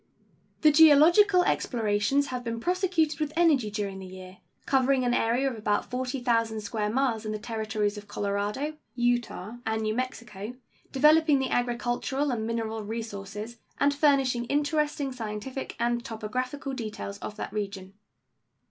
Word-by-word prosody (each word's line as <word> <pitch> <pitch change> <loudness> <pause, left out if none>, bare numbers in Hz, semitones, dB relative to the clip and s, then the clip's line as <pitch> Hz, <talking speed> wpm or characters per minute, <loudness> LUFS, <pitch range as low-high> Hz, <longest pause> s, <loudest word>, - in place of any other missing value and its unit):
The 305 - +6
geological 325 +6 +7
explorations 225 - +1
have 250 -1 -3
been 230 -1 -3
prosecuted 350 -1 +1
with 305 -1 -1
energy 305 -10 +3
during 200 -2 -4
the 190 - -8
year, 185 0 -11 0.3
covering 265 -1 +2
an 245 - +2
area 245 +3 +2
of 260 - -2
about 210 0 -1
40,000 245 -3 0
square 210 0 -2
miles 235 -2 0
in 215 - -3
the - - -2
Territories 215 -2 -2
of 205 - -15
Colorado, 205 +11 -2 0.2
Utah, 240 -3 -1
and 220 0 -1
New 215 0 0
Mexico, 230 -3 -5 0.4
developing 300 +2 +5
the 265 -1 -1
agricultural 245 +3 0
and 220 -2 -2
mineral 225 -1 -2
resources 215 0 -6 0.2
and 285 0 +3
furnishing 270 -5 +2
interesting 290 0 0
scientific 235 +2 -5
and 240 0 0
topographical 255 +6 -4
details 215 -4 -5
of 210 - -6
that - - -6
region. 195 -2 -5
240 Hz, 140 wpm, -27 LUFS, 215-275 Hz, 0.4 s, geological